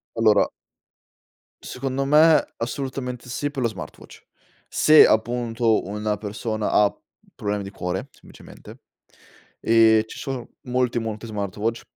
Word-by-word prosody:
Allora 110 -2 +3 1.1
secondo 135 +1 -3
me, 155 +2 +4
assolutamente 125 0 -5
sì, 145 +4 -3
per 140 -2 -5
lo 120 - +2
smartwatch. 105 -4 -11 0.4
Se 155 0 +6
appunto, 115 0 +1
una 105 +2 -2
persona 105 +1 -3
ha 105 -1 +3 0.4
problemi 105 0 -3
di - - -7
cuore, 95 +4 -4
semplicemente, - - -15 0.8
ehm, 110 -1 +5
ci - - -10
sono 130 -3 -5
molti, 125 -3 0
molti 110 -1 -5
smartwatch 105 +1 -3
115 Hz, 115 wpm, -23 LUFS, 105-125 Hz, 1.1 s, Se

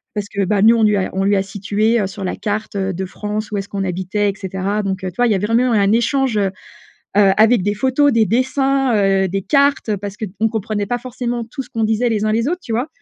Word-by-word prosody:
Parce 205 -1 -3
que, 200 0 -2
bah, 195 +1 +1
nous 225 +2 +7
on 230 - +1
lui 210 -1 +4
a 190 - -2
on 190 +1 -1
lui 200 +1 +3
a 190 - +1
situé, 205 +3 0
heu, 195 - -1
sur 195 +1 -8
la 185 - -2
carte, 210 0 -4
heu, 190 -1 -1
de 190 +2 -4
France 210 +3 -5
où 210 - -2
est-ce 195 0 -5
qu'on 195 -1 -3
habitait 190 +3 -1
et - - -11
cetera. 195 +1 -3
Donc 190 -1 -3
heu, 185 - -3
tu - - -28
vois, 245 - +3
il - - +1
y - - +3
a - - +1
vraiment 230 +5 +1
eu - - +4
un 200 0 +3
échange, 240 +1 +1
heu, 200 - +2 0.5
heu, 200 -1 +2
avec 220 +1 +5
des 205 +2 -1
photos, 265 +6 +2
des 230 -3 +3
dessins, 265 +2 +1
heu, 195 -2 +2
des 195 +1 -3
cartes, 280 -2 +2
heu, 210 - 0
parce 200 0 -6
qu'on 215 +1 -2
comprenait 215 -1 -3
pas 245 - -1
forcement 245 -1 -4
tout 255 +4 -6
ce 250 - -12
qu'on 225 - -2
disait, 220 +3 +1
les 215 -2 0
uns 215 - +1
les 230 +3 0
autres, 355 +3 -2
tu - - -7
vois? 240 +5 -1
210 Hz, 280 wpm, -18 LUFS, 195-235 Hz, 0.5 s, nous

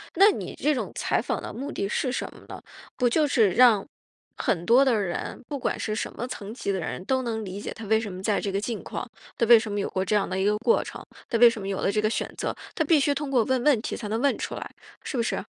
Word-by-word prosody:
那 395 +4 +7
你 - - -6
这 300 - +1
种 255 - -3
采 - - 0
访 - - -2
的 - - -7
目 280 +4 -5
的 200 - -2
是 255 - 0
什 265 - -3
么 - - -15
呢？ - - -9 0.3
不 250 -2 +2
就 300 +5 +2
是 225 -8 +3
让 225 -1 +5 0.5
很 175 -2 -1
多 255 +4 +6
的 260 - +3
人， 180 -3 -4
不 285 - -3
管 - - -1
是 215 - -2
什 - - -3
么 240 - -4
层 210 -3 -7
级 220 -5 -3
的 190 - -1
人 175 +2 -4
都 260 -1 +1
能 225 -2 -3
理 195 0 -6
解 - - -5
他 225 - -9
为 220 +2 +3
什 210 -4 -5
么 185 - -7
在 205 +1 +1
这 200 - -2
个 195 +1 -1
境 230 +1 -4
况， - - -6 0.3
他 235 - +1
为 235 0 +9
什 220 0 -2
么 205 - -1
有 - - -2
过 190 0 -1
这 210 - +1
样 200 - +1
的 190 - -2
一 190 - +1
个 210 +1 +3
过 460 - +3
程， - - -9 0.2
他 230 - 0
为 240 0 +9
什 230 - -5
么 195 - -5
有 195 - -2
了 195 - +1
这 215 - 0
个 215 0 +2
选 - - -2
择， - - -2 0.2
她 315 - +1
必 310 0 +5
须 285 +1 +2
通 280 -1 -3
过 245 -4 +4
问 260 0 0
问 265 -7 +4
题 - - -4
才 220 - -5
能 220 +3 -1
问 280 0 +2
出 - - -4
来， - - -7 0.3
是 265 - -4
不 235 - +2
是？ - - -2
225 Hz, 315 characters per minute, -26 LUFS, 200-260 Hz, 0.5 s, 为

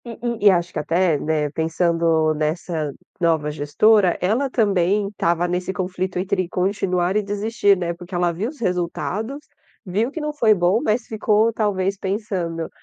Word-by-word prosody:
Hum, 230 -2 -8
hum, 235 -1 -2
e 205 - +7
acho 175 -2 +1
que - - -2
até, 170 +1 +1
né, 150 -1 -1
pensando 165 0 +1
nessa 155 0 -2 0.3
nova 160 -3 +1
gestora, 175 +7 +3
ela 225 +10 +1
também 200 -3 +1
estava 175 -3 0
nesse 180 +1 -2
conflito 185 0 -3
entre 185 -1 -1
continuar 185 -1 0
e 210 - +3
desistir, 205 0 +1
né, 170 -1 -2
porque 175 +2 -9
ela 175 0 +2
viu 200 +8 -3
os 295 - -13
resultados, 185 +6 -2 0.5
viu 205 +6 0
que 315 - -6
não 300 -1 -3
foi 225 -7 +4
bom, 180 +5 +2
mas 225 -2 0
ficou 220 +1 +1
talvez 195 -3 0
pensando, 190 -5 -3
185 Hz, 165 wpm, -21 LUFS, 170-210 Hz, 0.5 s, e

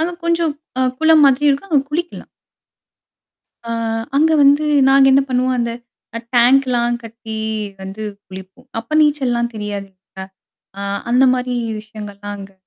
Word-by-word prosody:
அங்க 340 +2 -1
கொஞ்சம் 335 -2 +1 0.5
குளம் 320 -1 +5
மாதிரி 275 +1 +2
இருக்கும், 280 +8 -3
அங்க 280 -3 +4
குளிக்கலாம். 340 +3 -4 1.4
அ - - -7 0.5
அங்க 320 +2 +3
வந்து, 285 +2 +4 0.2
நாங்க 270 0 +6
என்ன 275 +1 +5
பண்ணுவோம்! 255 0 +1
அந்த 235 -1 -1 0.5
அ - - -4 0.2
டேங்க்லாம் 240 -1 +3
கட்டி 225 -1 -8 0.4
வந்து 195 +3 -7 0.2
குளிப்போம். 190 +7 -12
அப்போ 230 +7 -8
நீச்சல்லாம் 255 -6 +1
தெரியாது 205 -2 -5
இல்லயா! 190 0 -12 0.5
அ - - -6 0.3
அந்த 250 +2 +4
மாரி 250 0 -3 0.3
விஷயங்கள்லாம் 205 -2 -9
அங்க 195 0 -11
250 Hz, 135 wpm, -18 LUFS, 215-280 Hz, 1.4 s, நாங்க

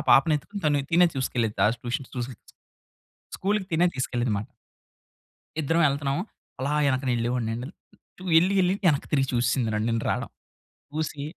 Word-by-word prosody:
పాపని 150 +5 +6
ఎత్తుకొని 200 +6 -9
తను 145 -2 +2
తినే 175 +1 +6
చూసుకెళ్ళి‌ది 120 -4 -1
తా - - +6 0.2
ట్యూషన్స్ 125 +2 -3
ట్యూషన్స్‌కి 125 0 -6 0.8
స్కూల్‌కి 200 0 0
తినే 170 +2 +4
తీసుకెళ్ళేది 125 -2 -1
అనమాట. 100 +1 -2 1.1
ఇద్దరం 165 +4 +2
ఎళ్తున్నాము. 140 +3 -1 0.4
అలా 140 +3 -1
వెనక 130 0 +1
వెళ్ళేవాడినండి 120 0 -1 0.7
ఎళ్లి, 185 +3 +2
ఎళ్లి 180 +1 +3
వెనక్కి 150 -4 +3
తిరిగి 135 -2 +2
చూసేసిందండి 120 -1 +1
నన్ను, 105 +2 0
నేను 115 0 -1
రావడం. - - -1 0.7
చూసి 155 -2 -3
135 Hz, 135 wpm, -26 LUFS, 120-160 Hz, 1.1 s, పాపని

